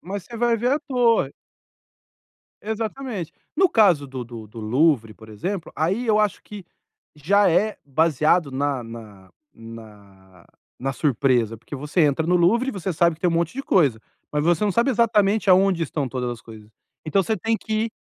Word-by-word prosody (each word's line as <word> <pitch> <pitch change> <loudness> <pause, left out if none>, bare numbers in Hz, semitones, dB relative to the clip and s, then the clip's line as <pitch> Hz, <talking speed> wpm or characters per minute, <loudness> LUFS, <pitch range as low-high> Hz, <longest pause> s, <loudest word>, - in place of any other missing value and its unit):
mas 195 +1 -6
você 235 - -10
vai 235 0 +2
ver 245 +4 0
a 295 - 0
torre. 230 - +2 1.3
Exatamente. 220 - -4 0.2
No 375 +3 +4
caso 185 - +4
do 130 -1 -6
do 115 -2 -10
do 110 +2 -11
Louvre, 115 0 +1
por 110 0 -15
exemplo, 170 - -5
aí 190 +10 -1
eu 215 -2 +3
acho 210 -2 0
que 205 -3 -10 0.5
já 195 +8 +3
é 210 +6 +1
baseado 155 +1 +2
na 135 -1 -2
na 110 -5 -12 0.2
na 100 -5 -14 0.3
na 135 +2 -2
surpresa, 125 -4 +1
porque 120 +6 -9
você 150 +6 -1
entra 150 +1 +2
no 180 - +3
Louvre 210 +9 +3
e - - -4
você 195 -4 -4
sabe 170 0 +2
que 160 - -31
tem 180 - +2
um - - -2
monte 170 0 0
de 275 +2 -5
coisa, 140 - +2 0.3
mas 150 0 0
você 170 +3 +2
não 205 - +1
sabe 235 +7 +2
exatamente 215 -3 +2
aonde 185 -2 +4
estão 145 -4 -3
todas 125 -1 -3
as 120 -2 -7
coisas. 110 -2 -13 0.4
Então 195 +5 +2
você 220 +3 -1
tem 225 +5 0
que 220 - -6
ir 230 - -7
165 Hz, 185 wpm, -22 LUFS, 125-210 Hz, 1.3 s, No